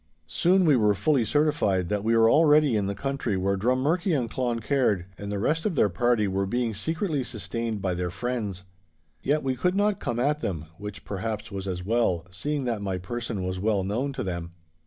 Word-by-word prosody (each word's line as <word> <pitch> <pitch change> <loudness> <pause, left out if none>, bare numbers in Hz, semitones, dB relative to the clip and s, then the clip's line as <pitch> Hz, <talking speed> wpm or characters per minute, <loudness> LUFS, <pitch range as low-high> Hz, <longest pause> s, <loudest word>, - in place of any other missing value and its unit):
Soon 185 +1 +3
we 150 -4 +5
were 105 -4 +3
fully 130 +5 +2
certified 110 - +1
that 105 -1 -1
we 115 +1 +3
were 115 0 +6
already 150 -2 +5
in 100 -2 +1
the 100 - -2
country 135 -3 -2
where 100 +1 +1
Drummurchie 145 - +1
and 120 -3 -2
Cloncaird 120 -5 0
and 100 +1 -6
the 100 - -1
rest 155 +10 0
of 200 -6 -1
their 105 - +4
party 110 +3 +2
were 95 0 -1
being 120 +2 -1
secretly 160 - -1
sustained 115 -2 -4
by 95 -2 0
their 90 0 -2
friends. 105 -2 -3 0.6
Yet 150 +3 +1
we 130 -1 0
could 180 +9 0
not 205 0 +2
come 120 -3 -2
at 145 +4 +1
them, 80 - -3
which 105 -1 -8
perhaps 105 +1 -4
was 100 -1 -5
as 90 -1 -4
well, 100 -6 +1
seeing 145 +9 -2
that 115 -4 -2
my 95 -2 -2
person 115 +1 -4
was 95 0 -3
well 100 -1 +1
known 120 +9 -1
to - - -3
them. 85 -2 -4
115 Hz, 200 wpm, -26 LUFS, 100-140 Hz, 0.6 s, were